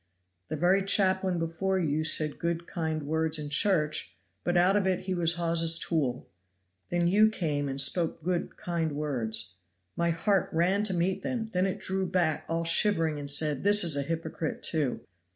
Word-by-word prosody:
"The - - -4
very 185 +3 +2
chaplain 190 -2 +2
before 165 +4 -1
you 155 -3 0
said 155 -1 +2
good, 170 0 -2
kind 160 -4 -3
words 160 +2 0
in 150 -1 -5
church, 155 -1 +1 0.3
but 175 0 0
out 180 +3 +4
of 200 -2 +1
it 185 -1 0
he 190 - -3
was 170 -2 +1
Hawes' 165 -1 +3
tool! 140 -9 -2 0.6
Then 175 0 0
you 210 +4 +5
came 150 -8 -2
and 135 0 -3
spoke 160 +3 0
good, 175 0 -2
kind 165 -3 -2
words. 115 -8 -2 0.4
My 170 0 0
heart 190 +4 +1
ran 180 +5 +1
to 190 -3 +1
meet 180 +2 -1
them; 225 -3 -4
then 185 +1 +1
it 190 - -3
drew 190 0 -2
back 170 -5 0
all 165 0 -1
shivering 165 -3 +2
and 140 -1 -3
said, 145 -1 +1
this 205 0 +4
is 165 -4 +2
a 140 - 0
hypocrite, 160 +1 -4
too! 150 -6 -1
165 Hz, 180 wpm, -28 LUFS, 155-185 Hz, 0.6 s, you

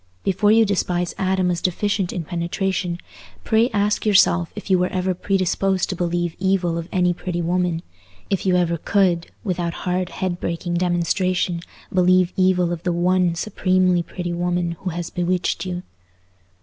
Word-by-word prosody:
Before 200 +2 +2
you 225 0 +6
despise 180 -3 -1
Adam 185 -1 +1
as 170 - -2
deficient 190 +1 0
in 175 - -3
penetration, 175 +1 -2 0.5
pray 225 +2 +3
ask 205 -1 0
yourself 85 - +4
if - - -8
you 190 -2 +3
were 180 - +2
ever 185 0 -1
predisposed 190 0 0
to 185 - -2
believe 175 -1 -1
evil 190 -3 +1
of 170 +2 -7
any 180 -1 +2
pretty 175 0 -4
woman—if 165 - -3
you 185 -2 +2
ever 170 -1 +1
could, 180 -4 +1
without 175 -4 -3
hard 180 0 0
head 180 -2 -3
breaking 170 +1 -3
demonstration, 180 0 0 0.3
believe 185 -1 +4
evil 185 -2 +2
of 165 - -5
the 180 - -1
one 175 0 +2
supremely 185 -1 +1
pretty 175 +1 -5
woman 175 0 -1
who 190 - -3
has 170 0 -5
bewitched 180 +1 -1
you. 180 0 -4
180 Hz, 155 wpm, -22 LUFS, 175-185 Hz, 0.5 s, you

